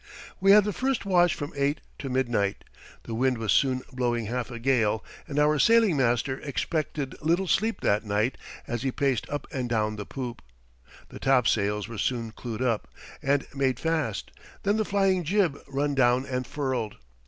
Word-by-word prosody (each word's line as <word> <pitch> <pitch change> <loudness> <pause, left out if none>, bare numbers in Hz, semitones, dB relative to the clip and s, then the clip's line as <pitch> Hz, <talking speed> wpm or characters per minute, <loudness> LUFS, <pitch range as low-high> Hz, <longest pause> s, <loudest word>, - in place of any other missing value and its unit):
We 195 - +3
had 205 +1 +8
the 210 0 -2
first 260 0 -1
watch 175 -3 +4
from 145 - -6
eight 140 +1 0 0.2
to 135 - -4
midnight. 120 -6 0 0.4
The 115 - -6
wind 125 +2 +1
was 110 -2 -1
soon 130 -2 +2
blowing 120 -2 0
half 120 +3 -3
a 120 - -6
gale, 115 -3 +1 0.2
and 145 - -5
our 150 0 +3
sailing 225 -1 +5
master 130 0 +1
expected 150 -1 -2
little 170 +5 +1
sleep 220 +6 +1
that 105 +2 +2
night 105 +4 0 0.3
as 120 -1 -3
he 135 0 0
paced 130 -4 0
up 145 - -3
and 125 -2 -3
down 110 -2 0
the 105 - -6
poop. 125 -3 -5 0.7
The - - -10
topsails 105 -6 +2
were 115 -3 -7
soon 115 -3 -1
clewed 115 +1 -5
up 115 -4 0 0.3
and 140 0 +1
made 135 -3 0
fast, 155 - -1 0.3
then 205 +2 +2
the 215 - +1
flying 195 -3 +2
jib 175 -2 +2
run 140 +1 -1
down 130 -1 +3
and 125 -2 -3
furled. 130 -7 -2
130 Hz, 175 wpm, -27 LUFS, 120-150 Hz, 0.7 s, had